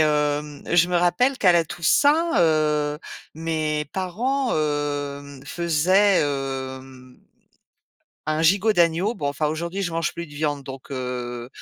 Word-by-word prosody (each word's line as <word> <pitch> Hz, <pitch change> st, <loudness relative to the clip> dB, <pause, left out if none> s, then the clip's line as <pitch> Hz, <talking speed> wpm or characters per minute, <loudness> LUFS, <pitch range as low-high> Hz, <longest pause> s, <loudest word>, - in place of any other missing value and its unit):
hem, 150 Hz, -1 st, 0 dB
je 175 Hz, -1 st, +5 dB
me 180 Hz, -, +1 dB
rappelle 245 Hz, +10 st, +2 dB
qu'à 185 Hz, -3 st, +5 dB
la 170 Hz, -1 st, +3 dB
Toussaint, 290 Hz, -, +2 dB
heu, 150 Hz, -3 st, +2 dB, 0.4 s
mes 155 Hz, -2 st, -2 dB
parents, 240 Hz, +9 st, -1 dB
hem, 145 Hz, -2 st, -3 dB
faisaient, 180 Hz, +4 st, +3 dB
hem, 130 Hz, -2 st, -5 dB, 1.1 s
un 155 Hz, +1 st, 0 dB
gigot 200 Hz, +6 st, +3 dB
d'agneau. 175 Hz, +4 st, +2 dB
Bon, 145 Hz, -11 st, -3 dB
enfin, 145 Hz, +2 st, -2 dB
aujourd'hui, 170 Hz, +5 st, -2 dB
je 180 Hz, -, -2 dB
mange 165 Hz, -1 st, -1 dB
plus 170 Hz, -, -5 dB
de 145 Hz, -, -15 dB
viande, 145 Hz, -1 st, -2 dB
donc, 135 Hz, -1 st, -10 dB
heu, 125 Hz, -2 st, -5 dB
155 Hz, 135 wpm, -23 LUFS, 145-175 Hz, 1.1 s, je